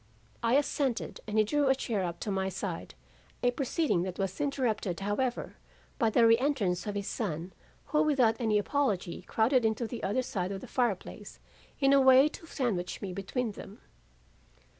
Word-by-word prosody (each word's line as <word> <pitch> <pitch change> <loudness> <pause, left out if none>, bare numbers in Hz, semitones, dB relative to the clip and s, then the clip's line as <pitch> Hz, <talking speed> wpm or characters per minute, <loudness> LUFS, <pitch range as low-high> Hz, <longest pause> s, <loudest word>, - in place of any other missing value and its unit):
"I 235 +2 +2
assented, 280 -3 0
and 215 0 -2
he 215 - +6
drew 285 +6 +1
a 265 - +4
chair 225 -7 -2
up 170 -1 -4
to 210 - -2
my 190 0 0
side, 185 -2 -5 0.5
a 245 - +4
proceeding 275 - 0
that 185 0 -4
was 195 +4 -3
interrupted, 230 -10 -1
however, 240 +5 -2 0.4
by 225 - +3
the 230 +1 +4
reentrance 230 -6 +2
of 205 - -3
his 200 -1 -2
son, 180 -5 -3 0.3
who 300 +1 +1
without 265 -8 +3
any 220 -2 +2
apology 205 -6 -1
crowded 245 +3 +2
into 220 +2 0
the 230 0 -6
other 250 +7 0
side 190 -6 -3
of 195 -1 -5
the - - -9
fire 240 -6 +1
place - - -11 0.4
in 275 0 +4
a 275 - +6
way 265 +2 +7
to 330 - -11
sandwich 210 - -2
me 190 -2 -4
between 215 +5 -2
them. 200 +1 -11
225 Hz, 180 wpm, -30 LUFS, 195-265 Hz, 0.5 s, way